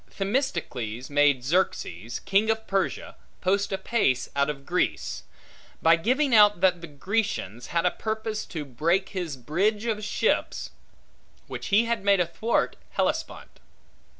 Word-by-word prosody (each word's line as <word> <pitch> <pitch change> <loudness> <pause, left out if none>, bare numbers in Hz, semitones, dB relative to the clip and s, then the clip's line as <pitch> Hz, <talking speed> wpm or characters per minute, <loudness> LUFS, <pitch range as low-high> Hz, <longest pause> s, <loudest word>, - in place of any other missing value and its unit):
Themistocles 170 - -3
made 145 -3 +3
Xerxes, 120 - -1
king 200 +3 +2
of 220 0 0
Persia, 195 0 -2 0.2
post 200 +2 +1
apace 190 - 0
out 140 +1 +2
of 140 -2 -5
Grecia, 140 - -1 0.6
by 165 +1 +5
giving 255 - +1
out, 210 -3 +6
that 180 -2 +3
the 170 - -7
Grecians 150 - -2
had 170 0 0
a 180 - +4
purpose 220 0 -4
to 155 -3 -5
break 170 +9 0
his 175 -8 -4
bridge 195 - 0
of 215 -2 -1
ships, 210 - -1 0.7
which - - -6
he 215 +3 +4
had 230 -3 -1
made 200 -1 +4
athwart 180 +7 0
Hellespont. - - -3
185 Hz, 135 wpm, -26 LUFS, 145-215 Hz, 0.7 s, out